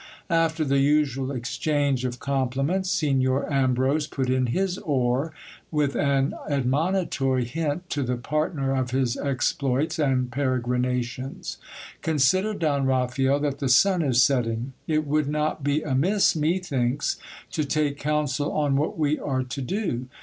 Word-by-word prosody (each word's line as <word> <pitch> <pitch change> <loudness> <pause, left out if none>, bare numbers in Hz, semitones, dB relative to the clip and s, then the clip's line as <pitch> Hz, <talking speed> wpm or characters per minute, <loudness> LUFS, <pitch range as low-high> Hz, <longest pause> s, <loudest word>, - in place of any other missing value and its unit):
After 165 -1 +2
the 140 0 +2
usual 135 -2 +2
exchange 140 +1 -1
of 125 -1 -3
compli 135 0 -1
ments, 185 +4 0
Signor 135 -4 +1
Ambrose 135 +3 +1
put 130 -4 -2
in 130 -1 +1
his 185 +8 -1
oar, 135 -2 0 0.4
with 150 -3 0
an 140 -1 +1 0.2
admonitory 140 -1 +1
hint 160 +6 -3
to 145 - -1
the 125 -1 -1
partner 140 +1 -1
of 130 -1 -1
his 130 -1 0
exploits 140 +3 -1
and 130 -4 +1
peregrinations. 125 -1 -2 0.4
Consider, 185 +8 +2
Don 145 -6 0
Raphael, 130 +2 +1
that 140 -2 -1
the 135 - -1
sun 180 +9 +5
is 125 -5 +4
setting. 120 -1 0
It 155 -1 +1
would 150 0 +1
not 150 0 -1
be 145 +2 +1
amiss, 175 +7 +2
methinks, 150 -5 0 0.3
to 155 - -1
take 145 0 0
counsel 145 -1 0
on 145 -2 +1
what 150 +3 -1
we 150 -1 +1
are 130 -2 -1
to 130 +2 -5
do. 130 - -2
140 Hz, 140 wpm, -25 LUFS, 130-155 Hz, 0.4 s, sun